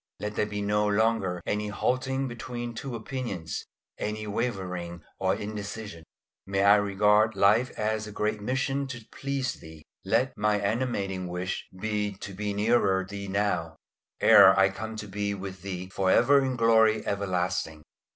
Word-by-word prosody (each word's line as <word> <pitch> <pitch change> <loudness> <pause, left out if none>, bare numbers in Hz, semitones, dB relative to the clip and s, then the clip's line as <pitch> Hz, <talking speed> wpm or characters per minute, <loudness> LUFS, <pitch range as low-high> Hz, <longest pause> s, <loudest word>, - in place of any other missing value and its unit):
Let 105 0 -4
there 105 - +1
be 105 -1 -4
no 105 +1 +1
longer 100 -4 +1
any 105 0 -1
halting 130 +5 -1
between 120 0 -6
two 125 +2 -5
opinions, 110 - -5 0.3
any 110 0 -3
wavering 90 -6 -3 0.2
or 95 0 +1
indecision. 105 -4 -6 0.4
May 95 0 +1
I 100 +1 +7
regard 105 +2 +3
life 110 +6 +4
as 110 0 -1
a - - -8
great 105 0 -1
mission 135 +4 -1
to 120 -4 -8
please 135 -2 -2
Thee. 80 -1 -13 0.2
Let 130 +2 +1
my 105 0 +1
animating 100 -4 -1
wish 90 +1 -4
be 105 0 -1
to 100 0 -8
be 105 +2 -3
nearer 100 -3 +2
Thee 100 +1 -7
now, 95 -5 -1 0.4
ere 95 0 +8
I 95 0 +5
come 110 +3 -6
to 105 -1 -6
be 100 +1 -2
with 95 -1 -7
Thee 95 -1 -5
for 95 -1 +1
ever 140 +7 +5
in 130 -1 -1
glory 110 -2 +4
everlasting. 90 -5 -2
105 Hz, 155 wpm, -27 LUFS, 95-115 Hz, 0.4 s, ere